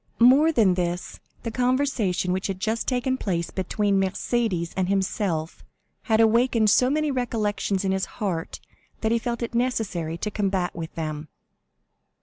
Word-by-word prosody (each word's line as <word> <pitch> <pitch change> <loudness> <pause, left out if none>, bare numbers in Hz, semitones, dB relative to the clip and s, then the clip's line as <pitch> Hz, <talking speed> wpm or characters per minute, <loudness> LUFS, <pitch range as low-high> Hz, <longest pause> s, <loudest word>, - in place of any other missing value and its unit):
More 270 +7 +6
than 220 - +4
this, 175 0 -3 0.2
the 230 - -3
conversation 245 -7 +1
which 190 +1 -2
had 190 -2 -4
just 220 +3 -1
taken 260 +1 0
place 170 -4 -2
between 200 +1 0
Mercédès 190 -2 -1
and 185 -1 0
himself 190 -4 -1 0.5
had 220 0 +4
awakened 225 -1 +4
so 250 +3 +4
many 305 +1 +1
recollections 210 -6 -1
in 190 - +1
his 190 0 0
heart 180 -7 -3 0.4
that 220 - +1
he 235 - +2
felt 235 0 -3
it 235 - -4
necessary 210 -10 -1
to 210 +5 -3
combat 195 -4 -1
with 165 -1 -6
them. 155 -1 -4
205 Hz, 150 wpm, -25 LUFS, 180-240 Hz, 0.5 s, More